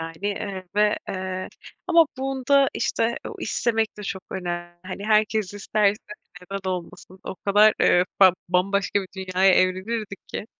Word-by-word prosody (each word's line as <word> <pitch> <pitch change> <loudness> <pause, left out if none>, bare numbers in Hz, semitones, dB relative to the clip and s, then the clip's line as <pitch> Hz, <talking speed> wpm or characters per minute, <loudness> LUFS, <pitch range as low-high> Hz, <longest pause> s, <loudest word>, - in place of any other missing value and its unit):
Yani, 165 0 -6
eee, 200 -2 -3
ve, 210 0 +3
eee, 185 0 -4 0.4
ama 335 -2 +5
bunda, 270 +1 +2
işte, 230 +1 0
o - - -8
istemek 225 -2 -1
de 210 - -8
çok 190 -2 -5
önemli. 175 -1 -5
Hani, 190 +2 -6
herkes 215 -2 +1
isterse 205 0 +1 0.4
neden 190 +1 -5
olmasın? 185 +1 -7
O - - -5
kadar, 205 +3 +4
eee, 180 - +4
fa 190 -2 +8 0.2
bambaşka 195 +3 +1
bir 190 - -10
dünyaya 190 0 +3
evrilirdik 195 +2 -1
ki. - - -5
200 Hz, 145 wpm, -24 LUFS, 185-215 Hz, 0.4 s, fa